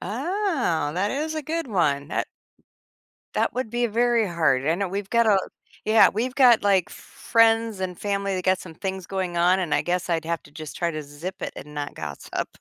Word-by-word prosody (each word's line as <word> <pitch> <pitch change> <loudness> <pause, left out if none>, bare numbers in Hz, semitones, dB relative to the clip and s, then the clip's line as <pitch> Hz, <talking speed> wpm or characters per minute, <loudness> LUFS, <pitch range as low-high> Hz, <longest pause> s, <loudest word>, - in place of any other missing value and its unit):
Oh, 275 - -1
that 200 +3 0
is 310 +3 -2
a 310 - -3
good 325 +2 -3
one, 150 - 0
that - - -1 1.1
that - - +1
would 250 -3 -3
be 240 0 +1
very 235 0 +2
hard. 155 -7 +1
I 160 - +3
know 195 +1 -2
we've 195 +1 -4
gotta 225 -4 +4 0.5
Yeah, 220 +1 +6
we've 245 +5 -2
got, 245 -5 +6
like, 195 -3 +3
f - - -10 0.4
friends 225 -2 +4
and 180 -2 -4
family 200 -1 -1
that 185 - -4
got 185 0 +3
some 165 -3 -10
things 190 -1 -4
going 185 -3 -3
on, 180 +2 +4
and 175 -5 0
I - - +3
guess 180 0 -1
I'd 165 -1 0
have 170 0 -2
to - - -16
just 155 0 -8
try 170 -1 0
to 155 -2 -5
zip 155 +6 -8
it - - -3
and 150 +1 -10
not 145 -1 -4
gossip. 75 -2 -5
190 Hz, 210 wpm, -24 LUFS, 170-230 Hz, 1.1 s, Yeah